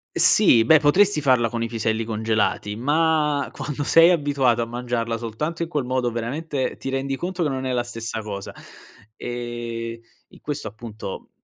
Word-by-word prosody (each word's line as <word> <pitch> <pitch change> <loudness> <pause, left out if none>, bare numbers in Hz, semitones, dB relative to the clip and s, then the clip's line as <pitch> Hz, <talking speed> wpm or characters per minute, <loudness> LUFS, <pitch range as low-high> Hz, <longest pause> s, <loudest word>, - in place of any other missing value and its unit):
Sì 120 - +6
beh, 160 +7 +6
potresti 165 +4 +3
farla 125 -4 +3
con 115 0 -3
i - - -1
piselli 115 -1 -1
congelati 110 -2 -1
ma 150 +3 +1
quando 145 +1 -4
sei 165 +4 +6
abituato 140 -7 +2
a - - 0
mangiarla 120 -1 -2
soltanto 150 +9 -4
in 165 - -6
quel 145 -6 -2
modo, 125 -1 0
veramente 130 +4 -3
ti 135 - -5
rendi 135 0 -2
conto 180 +4 -4
che 155 - +1
non 130 -1 -3
è 130 - -1
la 120 -1 +1
stessa 115 -1 -5
cosa. 100 -2 -6 0.6
Ehm, 120 -1 -5 0.3
in - - -18
questo 145 -6 -4
appunto, 110 -2 -8
125 Hz, 170 wpm, -23 LUFS, 115-145 Hz, 0.6 s, Sì